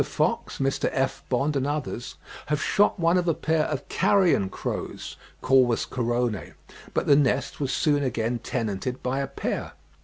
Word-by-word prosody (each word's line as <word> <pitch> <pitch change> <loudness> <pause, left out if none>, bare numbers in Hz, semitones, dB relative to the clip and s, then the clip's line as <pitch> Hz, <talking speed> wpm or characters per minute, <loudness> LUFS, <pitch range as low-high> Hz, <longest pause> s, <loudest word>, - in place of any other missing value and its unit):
Fox, - - -1
Mr. 135 0 0
F. 135 0 0
Bond, 140 +4 +1
and 135 0 0
others 145 -5 -4 0.3
have 150 -1 0
shot 205 +5 +2
one 170 +2 +3
of 175 - -2
a 165 - +2
pair 160 -1 +1
of 145 -3 -4
carrion 185 - +3
crows - - -5 0.3
(Corvus 130 -3 +3
corone), 120 -3 -2 0.4
but - - +1
the 140 - +6
nest 140 -1 +1
was 135 -2 -1
soon 145 -2 +2
again 120 -2 -1
tenanted 115 +1 -3
by 130 +2 -1
a 140 - -1
pair. 140 - -4
135 Hz, 160 wpm, -26 LUFS, 125-150 Hz, 0.4 s, the